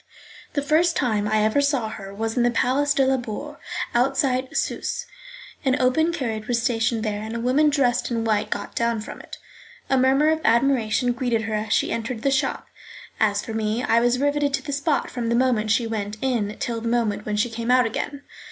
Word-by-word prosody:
The 285 - -1
first 325 +4 +3
time 215 -6 0
I 215 0 +2
ever 220 +6 +2
saw 275 -6 0
her 195 -3 -8
was 225 +2 -3
in 245 - +2
the 240 - +4
Place 275 +4 +1
de 270 - +3
la 265 0 +2
Bourse, 255 +5 -6 0.4
outside 260 +1 +1
Susse's; 485 - -2 0.6
an 265 0 +1
open 315 +7 +2
carriage 235 -9 -3
was 240 -2 +1
stationed 230 -1 0
there, 210 -2 -2
and 220 +2 -5
a - - -2
woman 265 +6 +3
dressed 250 -4 +1
in 230 -2 -1
white 215 -2 0
got - - -4
down 235 -1 0
from - - -8
it. - - -10 0.5
A 265 - +4
murmur 270 +4 +4
of 315 0 -1
admiration 245 -1 +2
greeted 240 -2 -1
her 220 0 -3
as 215 +1 -2
she - - +2
entered 230 0 -3
the 275 - +2
shop. 270 - 0 0.5
As 205 -2 +1
for 225 - -5
me, 220 +2 -1
I 230 - +3
was 240 +1 +2
rivetted 285 +1 +1
to 270 - -6
the 285 - -4
spot 285 +1 0
from 235 -2 -3
the 235 - +2
moment 235 -4 +2
she 225 +2 +2
went 215 -2 -4
in 230 -5 -1
till 230 -1 -3
the 230 - -4
moment 230 -3 0
when 210 0 -1
she 225 +3 0
came 230 +1 -4
out 250 -1 +5
again. 285 +5 -4
240 Hz, 215 wpm, -23 LUFS, 220-270 Hz, 0.6 s, out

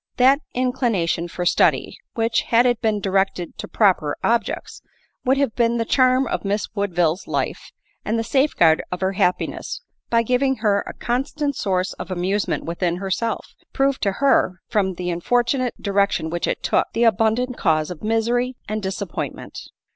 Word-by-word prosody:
that 265 +3 +5 0.2
inclination 235 -10 0
for 175 +1 -4
study, - - +2 0.2
which, 225 0 +1
had 235 +1 +5
it 245 -2 +1
been 215 -2 +1
directed 195 -2 -1
to - - -5
proper 180 -9 +2
objects, 235 0 -1 0.4
would 265 +2 +3
have 275 -5 +1
been 235 -1 +2
the 230 - 0
charm 255 +2 +3
of - - -3
Miss 205 +1 -1
Woodville's, 180 -4 0
life - - -3 0.3
and 220 +2 -1
the 225 - 0
safeguard 225 - +3
of 180 - -4
her 190 0 +1
happiness, 185 - -1 0.3
by 230 0 +3
giving 255 +3 +1
her 210 -4 +1
a - - -7
constant 280 +4 -2
source 185 -3 -1
of - - -6
amusement 190 +3 -1
within 170 +1 -1
herself, 195 +5 -3 0.2
proved 275 0 +1
to 200 -2 +1
her, 190 -7 +2
from 195 -5 0
the 180 0 -3
unfortunate 245 +8 0
direc 200 0 +2
tion 160 -1 -3
which 175 0 -2
it - - -2
took, - - +2
the 235 - +2
abundant 230 +3 +2
cause 155 -6 +1
of 175 - -8
misery 235 +3 0
and 215 +1 -3
dis 190 0 -4
appointment. 180 - -6
215 Hz, 170 wpm, -22 LUFS, 185-245 Hz, 0.4 s, that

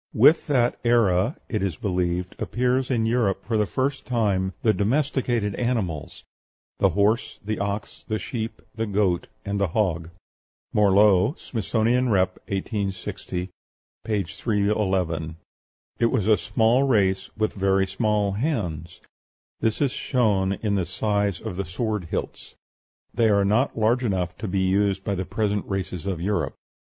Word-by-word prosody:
With 145 +9 +5
that 125 -5 +2
era, 115 - +3
it 110 - -2
is 95 -5 -1
believed, 90 -2 -1
appears 125 +1 0
in 115 -4 +1
Europe 110 -5 +1
for 115 - -1
the 105 -1 +2
first 135 +4 -1
time 100 -6 +1
the 110 - +4
domesticated 120 -2 0
animals 100 - -2 0.6
the - - +4
horse, 105 +4 +1
the 110 +1 -2
ox, 100 +1 -4
the 110 - -1
sheep, 115 0 -5
the 115 0 -2
goat, 100 -4 +1 0.2
and 100 0 -2
the 100 - +3
hog. 85 -4 -1 0.6
(Morlot, 100 - +4
"Smithsonian 120 +2 0
Rep.," 95 -3 +2
1860, 95 -2 -3 0.5
p. 105 -3 0
311.) 95 -5 -1 0.6
It 115 - +4
was 105 -4 0
a 110 0 +5
small 110 +4 +2
race, 100 -8 +2
with 110 0 0
very 95 0 +2
small 105 +1 0
hands; 95 - -3 0.6
this 110 +4 0
is 135 - +1
shown 100 -9 +1
in 105 -2 +1
the 95 -4 0
size 100 0 0
of 90 - -6
the 100 - -2
sword 105 +2 -2
hilts: - - -5 0.6
they 115 -2 +3
are 100 -1 +3
not 115 +7 +1
large 115 +3 +2
enough 90 -5 -1
to 110 - -4
be 95 0 0
used 95 +1 +1
by 100 - -1
the 95 -1 -2
present 105 -1 -1
races 95 -3 -3
of 95 -4 -2
Europe. 100 +4 -1
105 Hz, 145 wpm, -24 LUFS, 95-115 Hz, 0.6 s, With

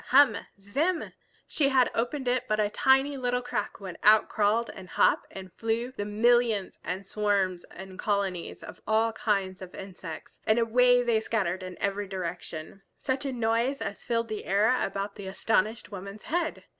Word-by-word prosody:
Hum! 265 -4 +6 0.2
Zim! 290 - -1 0.3
She 280 -3 +1
had 260 -2 +4
opened 250 +3 -2
it 250 0 +1
but 215 0 0
a 210 -1 +1
tiny 270 +3 +3
little 250 -1 -1
crack 245 0 -3
when 190 -3 -8
out 215 +1 +6
crawled 220 +3 +1
and 185 -1 -11
hopped - - +3
and 190 -2 -10
flew 230 +2 -2
the 205 -5 -4
millions 220 -1 +2
and 190 +2 -4
swarms 195 -3 0
and 190 0 -11
colonies 195 -4 -2
of - - -10
all 220 +1 +3
kinds 195 -4 -1
of 185 -1 -9
insects, 185 -4 -9
and 215 - +4
away 245 +2 +4
they 235 -2 +2
scattered 195 -5 -1
in 185 -1 -7
every 200 0 -1
direction. 180 -1 -6
Such 265 +1 -2
a 275 - -1
noise 235 +3 0
as 200 - -5
filled 230 -1 0
the 215 -1 -4
air 210 +6 +3
about 200 +1 -3
the 200 -2 -7
astonished 215 +3 0
woman's 200 +1 -8
head! 335 0 -2
215 Hz, 170 wpm, -28 LUFS, 195-245 Hz, 0.3 s, Hum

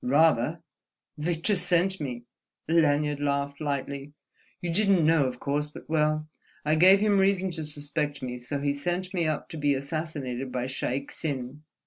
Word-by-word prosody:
"Rather! 150 +2 +3 0.6
Victor 170 +6 +1
sent 180 +1 +2
me." 125 -4 -4 0.4
Lanyard 150 -3 +2
laughed 140 0 -1
lightly. 140 0 -3 0.5
"You 170 -2 -3
didn't 195 -3 +3
know, 160 -3 +4
of 125 -1 -3
course, 145 +1 -1
but—well, 155 0 -1 0.4
I 155 - +3
gave 185 +5 +7
him 205 -2 +3
reason 190 -1 +2
to 160 -2 -5
suspect 145 -1 -3
me, 125 -1 -4
so 125 +4 -3
he 140 0 +1
sent 175 +6 -3
me 170 -3 +1
up 155 -1 -2
to 160 - -7
be 145 -1 +2
assassinated 140 -3 -4
by 125 -1 -2
Shaik 135 +1 -3
Tsin. 140 -1 -4
150 Hz, 155 wpm, -27 LUFS, 140-165 Hz, 0.6 s, gave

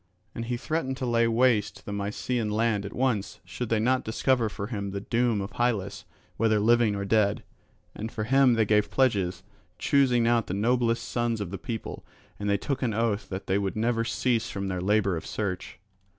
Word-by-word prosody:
And 115 - -5
he 120 +1 -2
threatened 135 -1 -2
to 130 - -3
lay 115 -1 +2
waste 115 -2 +1
the 105 - -5
Mysian 105 +3 -2
land 105 -2 0
at - - -9
once, 120 -6 -1
should 110 +6 -5
they 115 - +2
not 125 +4 +2
discover 115 +1 +1
for 100 -1 -5
him 100 -3 -4
the 100 +1 -4
doom 115 -1 +1
of 100 - -5
Hylas, 100 -6 -1 0.3
whether 110 -1 +3
living 115 0 +3
or 100 0 -3
dead. 105 0 +2 0.5
And 110 +2 -6
for 110 - -3
him 130 +1 +4
they 110 -1 +3
gave 105 0 +2
pledges 100 -9 +1 0.3
choosing 125 -4 +3
out 115 -1 +2
the 90 - -2
noblest 115 +2 +1
sons 120 -2 -1
of 100 -4 -4
the 95 - -5
people 115 +1 -6 0.4
and 105 0 -2
took 135 +3 -3
an 115 -5 0
oath 110 -2 0
that 95 0 -5
they 95 +2 +1
would 100 -1 -2
never 115 +1 +1
cease 115 -1 0
from 100 0 -4
their 90 -1 -2
labour 100 -1 +2
of 80 - -7
search. 95 -5 -4
110 Hz, 195 wpm, -27 LUFS, 100-120 Hz, 0.5 s, him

